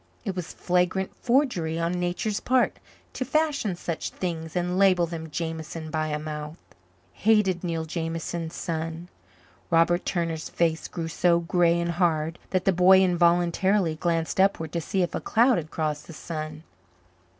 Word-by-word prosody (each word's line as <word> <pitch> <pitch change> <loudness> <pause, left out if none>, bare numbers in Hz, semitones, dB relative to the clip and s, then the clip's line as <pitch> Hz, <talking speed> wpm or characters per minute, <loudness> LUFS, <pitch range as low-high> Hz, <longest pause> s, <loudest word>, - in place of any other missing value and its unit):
It 195 -3 -2
was 180 -2 -5
flagrant 180 +1 0
forgery 235 - +1
on 170 0 0
Nature's 180 +4 -1
part 255 0 +2 0.4
to - - -2
fashion 285 - 0
such 170 -1 -4
things 165 -3 -5
and 180 +1 0
label 185 -3 +5
them 160 -1 -6
Jameson 160 0 -5
by 155 -1 -1
a 150 -1 -1
mouth. 150 +1 -6 0.6
Hated 200 -5 +2
Neil 165 -2 -2
Jameson's 165 0 -4
son! 165 +1 -4 0.6
Robert 170 +1 +3
Turner's 165 -3 -2
face 165 -1 0
grew 165 -2 -5
so 170 +1 +2
grey 170 0 +2
and 170 0 -1
hard 165 -1 0
that 185 -1 0
the 195 - +4
boy 185 +2 +6
involuntarily 175 +1 +2
glanced 165 +1 -1
upward 190 -5 +2
to 170 - -2
see 185 +4 0
if 175 - -3
a - - -2
cloud 235 -1 +3
had 155 -1 -8
crossed 155 -2 -3
the 165 - -9
sun. 155 -1 -6
170 Hz, 155 wpm, -26 LUFS, 160-185 Hz, 0.6 s, boy